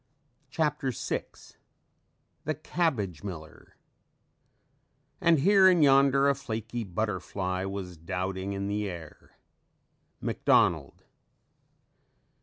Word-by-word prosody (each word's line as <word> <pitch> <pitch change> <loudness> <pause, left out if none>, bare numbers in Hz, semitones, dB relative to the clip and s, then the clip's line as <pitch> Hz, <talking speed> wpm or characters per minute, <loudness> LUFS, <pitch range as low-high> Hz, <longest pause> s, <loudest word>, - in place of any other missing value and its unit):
CHAPTER 150 -2 -1
VI 125 - -3 1.2
THE 155 +1 -1
CABBAGE 130 - -2
MILLER 80 -6 -9 1.5
"And 165 -4 +4
here 195 +3 +6
and 180 -4 +5
yonder 140 0 +5
a 140 - +4
flaky 120 -3 -5
butterfly 95 -1 -3
Was 95 -3 -6
doubting 95 +3 -3
in 100 0 -3
the 105 0 -2
air." 85 -4 -11 0.8
MCDONALD. 80 -5 +1
105 Hz, 85 wpm, -28 LUFS, 95-140 Hz, 1.5 s, here